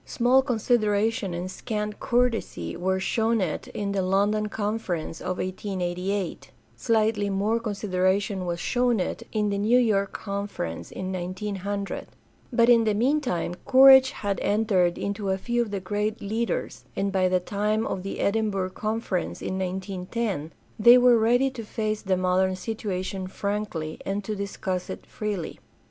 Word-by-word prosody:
Small 250 +2 +3
consideration 220 -4 +1
and 180 +2 -4
scant 210 0 -4
courtesy 245 -2 0
were 190 +2 0
shown 225 +3 +1
it 180 -6 -2
in 200 -1 -3
the 200 -1 0
London 205 +3 +1
Conference 205 -7 -3
of 185 - -3
1888; 185 0 -3 0.3
slightly 220 -3 +1
more 205 +4 +1
consideration 195 -3 0
was 170 0 -2
shown 245 +2 +1
it 180 - -2
in 210 -2 0
the 200 - -1
New 220 +4 +4
York 205 -5 +2
Conference 200 - -5
of - - -12
1900; 195 +2 -4 0.4
but 235 -1 +4
in 235 -2 +6
the 215 -1 +2
meantime 245 - 0
courage 265 0 +8
had 200 -5 -3
entered 200 -5 +2
into 200 0 -3
a 190 - +1
few 240 +4 0
of 235 - -2
the 200 -1 -3
great 210 +3 -2
leaders, 220 0 -2
and 195 0 0
by 185 -1 +2
the 185 0 +3
time 210 +4 -1
of 185 - -3
the 195 - -5
Edin 220 +1 +1
burgh 190 -2 -2
Conference 215 -4 -2
of - - -3
19 190 0 -4
10 195 -10 -2 0.3
they 235 +3 +9
were 245 -2 +6
ready 245 +4 +3
to 245 -3 -7
face 215 0 -2
the 190 -2 0
modern 185 +1 +2
situation 190 -2 -4
frankly 200 -5 -3
and 200 +1 -2
to 215 +2 -3
discuss 190 -2 -3
it - - -7
freely. 205 -6 -4
205 Hz, 155 wpm, -26 LUFS, 185-225 Hz, 0.4 s, they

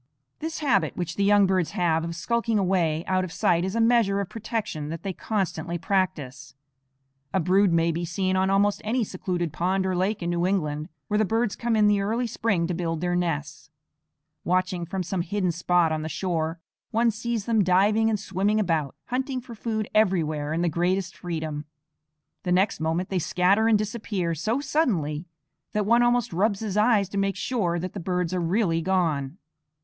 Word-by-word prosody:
This 320 +1 -4
habit 240 -10 +1
which 175 -3 -3
the 200 - 0
young 205 0 +5
birds 185 -3 0
have 165 -2 +1
of 170 0 -4
skulking 230 +5 0
away 175 -4 +1
out 185 -1 +1
of 185 - -5
sight 170 +1 +2
is 190 +3 -2
a - - +1
measure 225 -4 +3
of 200 -2 -3
protection 215 -9 -4
that 165 0 -6
they 195 - -3
constantly 175 -5 -2
practise. 155 -8 -2 0.8
A - - +4
brood 190 +2 +3
may 165 0 +3
be 170 +2 -3
seen 185 +2 -1
on 190 0 +2
almost 200 +1 +2
any 235 +3 0
secluded 180 -4 -3
pond 190 +2 0
or 185 -1 0
lake 190 +2 0
in 170 - -1
New 175 +1 +1
England, 155 -6 -1 0.2
where 210 +4 +1
the - - +4
birds 225 +1 0
come 235 -1 0
in 215 -1 +4
the 205 -1 +3
early 225 +5 0
spring 215 -6 0
to 180 - -2
build 165 -2 -2
their 175 +1 0
nests. 150 -4 -3 0.7
Watching 180 -1 0
from 190 +1 -3
some 180 +1 -2
hidden 185 +1 -1
spot 175 -1 +2
on 155 0 -1
the 160 - -4
shore, 165 -1 -2 0.3
one 230 +1 +2
sees 230 -1 -3
them 225 -3 +3
diving 205 +5 +3
and 215 -2 0
swimming 200 +2 0
about, 160 -9 0
hunting 260 +1 -1
for 245 -1 -10
food 220 -1 -3
everywhere 160 -8 +1
in 165 +2 0
the - - +2
greatest 175 +3 0
freedom. 155 -4 -4 0.8
The 180 - -3
next 190 +3 +2
moment 165 +3 -1
they 190 - 0
scatter 190 +6 +2
and 225 -2 +5
disappear 205 -5 -2
so 220 - -1
suddenly 180 - 0 0.5
that 210 -2 0
one 235 +3 +4
almost 240 -4 +2
rubs 200 +3 +1
his 210 -3 -3
eyes 210 -2 +3
to 200 - -2
make 195 0 0
sure 200 -5 -1
that 180 +1 -4
the 200 - -5
birds 180 0 -1
are 180 - 0
really 170 -1 +1
gone. 165 -5 0
185 Hz, 195 wpm, -25 LUFS, 170-215 Hz, 0.8 s, young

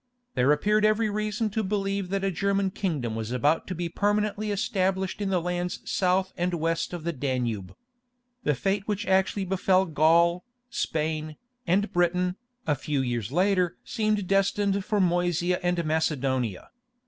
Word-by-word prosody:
There 125 +3 +3
appeared 210 +8 +2
every 215 0 +3
reason 215 +1 -1
to 220 +2 -1
believe 195 -1 -1
that 195 0 -1
a 195 - +1
German 195 +1 0
kingdom 150 - -2
was 110 0 -4
about 145 +6 +1
to 185 - -4
be 175 +1 -2
permanently 210 +3 0
established 190 -2 -1
in 200 - 0
the 185 -2 +2
lands 180 +1 -2
south 185 0 +1
and 175 0 -1
west 165 0 -1
of 175 -3 -6
the 170 +1 -1
Danube. 120 - -2 0.7
The 150 - +1
fate 195 +7 -1
which 210 -1 -1
actually 190 +1 +2
befell 190 0 +2
Gaul, 170 +2 +3 0.3
Spain, 155 0 -2 0.3
and 200 +5 +2
Britain, 180 +1 +1 0.3
a 150 - +2
few 145 0 -1
years 120 -4 -2
later 180 +1 +2
seemed 215 -2 0
destined 195 +1 +1
for 210 +1 0
Moesia 175 -1 +1
and 175 -1 0
Macedonia. 135 - -1
180 Hz, 155 wpm, -27 LUFS, 155-200 Hz, 0.7 s, There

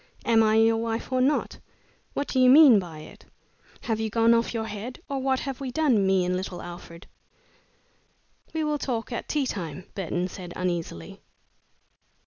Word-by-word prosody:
Am 225 -1 +4
I 215 0 +3
your 225 0 +4
wife 230 +2 -3
or 255 0 +1
not? 280 +3 0 0.6
What 285 - -2
do 260 - 0
you 255 0 +6
mean 270 -5 +8
by 165 -5 -8
it? - - -14 0.6
Have 225 -2 -2
you 220 0 -1
gone 230 +1 +4
off 230 0 +1
your 225 -2 -3
head, 220 +4 -7
or 275 -1 -3
what 265 0 0
have 270 -1 -5
we 265 - -3
done 250 -8 +2
me 190 -1 +2
and 180 0 0
little 185 -1 -5
Alfred?" 175 0 -10 1.5
"We 320 -1 -2
will 300 -1 -1
talk 240 -3 -3
at 235 - -5
tea 295 -3 0
time," 180 - -6
Burton 180 -1 -2
said, 180 -1 -9
uneasily. 170 - -4
225 Hz, 175 wpm, -26 LUFS, 185-255 Hz, 1.5 s, mean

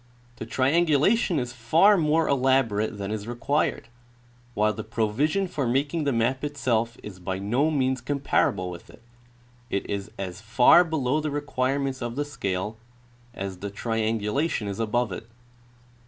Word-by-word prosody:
The 110 - -7
triangulation 160 - +2
is 125 -3 -2
far 160 - +4
more 160 -2 +2
elaborate 130 -6 +1
than 100 0 -4
is 110 0 -4
required, 120 +2 -1 0.7
while 105 +1 +2
the 110 - -6
provision 120 - 0
for 140 -7 -2
making 140 +5 0
the 140 - +2
map 125 +3 0
itself 120 -5 -1
is 95 -3 -9
by 95 +1 -3
no 120 +10 +1
means 130 -4 0
comparable 120 -8 0
with 85 -1 -11
it: - - -17 0.7
it 100 - -2
is 100 0 -4
as 95 -1 -5
far 125 +10 +6
below 155 -4 0
the 155 - -2
requirements 135 -2 -1
of 120 -1 -4
the 145 +1 -1
scale 105 -6 -3 0.6
as 95 -1 -5
the 100 - -4
triangulation 110 +4 -1
is 100 +1 -4
a1)0ve 115 0 0
it. 100 +5 -7
120 Hz, 150 wpm, -26 LUFS, 105-145 Hz, 0.7 s, far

